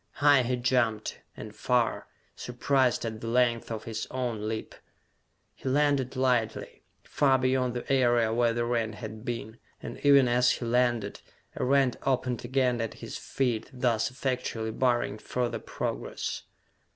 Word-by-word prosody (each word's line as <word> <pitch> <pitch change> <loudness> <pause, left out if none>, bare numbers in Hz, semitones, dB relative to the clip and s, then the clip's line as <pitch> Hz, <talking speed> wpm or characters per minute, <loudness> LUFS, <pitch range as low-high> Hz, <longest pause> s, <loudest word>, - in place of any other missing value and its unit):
High 145 -2 +5
he 125 +1 0
jumped, 120 -3 0 0.2
and - - -9
far, - - 0 0.3
surprised 125 0 +1
at 110 -1 -5
the 115 - -5
length 120 -1 +2
of 110 -1 -4
his 115 -1 -4
own 120 -5 -3
leap. 110 0 -4 0.8
He 130 - -5
landed 140 -2 +1
lightly, 125 -4 0 0.2
far 135 -2 +2
beyond 130 -1 +1
the 125 +3 -2
area 120 -4 +3
where 120 0 +3
the 120 0 -1
rent 115 -2 -1
had 110 -1 -8
been, 115 -1 -5 0.2
and - - -8
even 140 -2 +6
as 125 +1 +3
he 120 - -4
landed, 120 -3 +1 0.3
a - - -2
rent 135 -1 +3
opened 125 -2 -1
again 125 -1 +1
at 115 - -4
his - - -7
feet, 120 -5 -1
thus 120 -3 0
effectually 125 -3 -3
barring 120 -3 0
further 125 +1 -2
progress! - - -4
120 Hz, 150 wpm, -28 LUFS, 115-130 Hz, 0.8 s, even